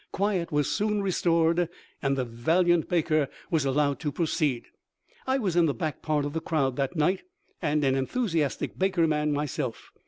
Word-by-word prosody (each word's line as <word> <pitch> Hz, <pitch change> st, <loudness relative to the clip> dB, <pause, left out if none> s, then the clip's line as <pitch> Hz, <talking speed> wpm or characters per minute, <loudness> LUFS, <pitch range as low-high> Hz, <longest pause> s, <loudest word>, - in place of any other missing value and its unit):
Quiet 195 Hz, -4 st, 0 dB
was 150 Hz, -2 st, +1 dB
soon 205 Hz, +7 st, 0 dB
re 195 Hz, -, 0 dB
stored, 170 Hz, 0 st, +2 dB, 0.3 s
and 135 Hz, 0 st, +1 dB
the 130 Hz, -, 0 dB
valiant 165 Hz, +9 st, +2 dB
Baker 155 Hz, -5 st, +2 dB, 0.2 s
was 155 Hz, -4 st, +2 dB
allowed 140 Hz, +1 st, +1 dB
to 150 Hz, -, -2 dB
pro 170 Hz, -, -1 dB
ceed. 140 Hz, -6 st, 0 dB, 0.6 s
I 260 Hz, +1 st, +2 dB
was 195 Hz, -9 st, -1 dB
in 170 Hz, -2 st, +5 dB
the 140 Hz, -, -1 dB
back 155 Hz, +3 st, -3 dB
part 150 Hz, -2 st, 0 dB
of 145 Hz, -, -4 dB
the 160 Hz, -, -2 dB
crowd 140 Hz, -6 st, 0 dB
that 140 Hz, +4 st, -1 dB
night, 175 Hz, +5 st, +2 dB, 0.4 s
and 150 Hz, 0 st, +1 dB
an 135 Hz, -1 st, +3 dB
enthusiastic 155 Hz, -, -1 dB
Baker 185 Hz, -3 st, +2 dB
man 150 Hz, -1 st, +1 dB
myself. 145 Hz, -3 st, -3 dB
155 Hz, 185 wpm, -27 LUFS, 145-175 Hz, 0.6 s, in